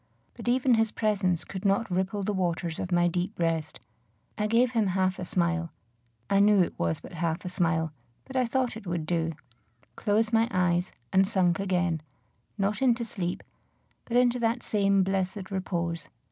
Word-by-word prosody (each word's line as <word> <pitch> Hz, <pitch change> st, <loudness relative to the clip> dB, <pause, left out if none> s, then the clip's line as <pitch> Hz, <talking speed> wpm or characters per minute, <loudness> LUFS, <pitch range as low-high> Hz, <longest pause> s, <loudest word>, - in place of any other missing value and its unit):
But -, -, -10 dB
even 255 Hz, +1 st, +3 dB
his 225 Hz, -1 st, +2 dB
presence 195 Hz, -6 st, 0 dB
could 190 Hz, -1 st, -7 dB
not 200 Hz, +1 st, +1 dB
ripple 190 Hz, +3 st, -1 dB
the 210 Hz, -, -1 dB
waters 170 Hz, -3 st, -1 dB
of 185 Hz, -, -4 dB
my 175 Hz, 0 st, +4 dB
deep 180 Hz, +4 st, -2 dB
rest. 165 Hz, -3 st, -1 dB, 0.6 s
I 210 Hz, 0 st, 0 dB
gave 235 Hz, +3 st, +3 dB
him 225 Hz, -4 st, +2 dB
half 185 Hz, 0 st, 0 dB
a -, -, -3 dB
smile, 170 Hz, -1 st, 0 dB, 0.6 s
I 195 Hz, -, +3 dB
knew 205 Hz, -2 st, +6 dB
it -, -, -4 dB
was 85 Hz, -1 st, 0 dB
but -, -, -12 dB
half 170 Hz, 0 st, -2 dB
a -, -, -2 dB
smile, 165 Hz, -3 st, 0 dB, 0.3 s
but 265 Hz, -, -11 dB
I 255 Hz, -2 st, +2 dB
thought 255 Hz, 0 st, 0 dB
it 220 Hz, -3 st, -9 dB
would 170 Hz, -2 st, -2 dB
do, 165 Hz, 0 st, 0 dB, 0.6 s
closed 220 Hz, +1 st, +1 dB
my 225 Hz, 0 st, +4 dB
eyes, 180 Hz, 0 st, +1 dB, 0.2 s
and 190 Hz, 0 st, +5 dB
sunk 185 Hz, -4 st, +2 dB
again, 180 Hz, -4 st, 0 dB, 0.6 s
not 205 Hz, +4 st, 0 dB
into 240 Hz, -3 st, +3 dB
sleep, 180 Hz, -6 st, -4 dB, 0.6 s
but 240 Hz, -, 0 dB
into 250 Hz, 0 st, +3 dB
that 235 Hz, +1 st, 0 dB
same 200 Hz, -2 st, +2 dB
blessed 190 Hz, +1 st, -2 dB
repose. 170 Hz, -4 st, -2 dB
190 Hz, 175 wpm, -28 LUFS, 175-215 Hz, 0.6 s, knew